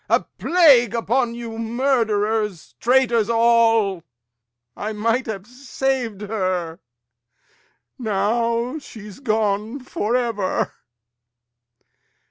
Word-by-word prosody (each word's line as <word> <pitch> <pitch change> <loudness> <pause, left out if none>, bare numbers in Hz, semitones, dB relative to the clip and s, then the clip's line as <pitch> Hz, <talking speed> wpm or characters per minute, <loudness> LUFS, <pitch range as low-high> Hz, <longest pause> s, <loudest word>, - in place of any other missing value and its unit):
Lear. - - +5
A - - -16 0.2
plague 275 - +5
upon 235 +1 0
you, 230 -1 -7
murderers, 220 - 0
traitors 240 -3 +2
all! 225 -5 +3 0.7
I 215 +1 -4
might 230 +4 0
have 200 -3 -5
sav'd 250 -3 -3
her; 185 -6 -2 1.2
now 230 +5 0
she's 210 -6 -11
gone 215 0 -1
for 245 -3 -2
ever! 230 -6 -1
230 Hz, 90 wpm, -21 LUFS, 210-245 Hz, 1.2 s, Lear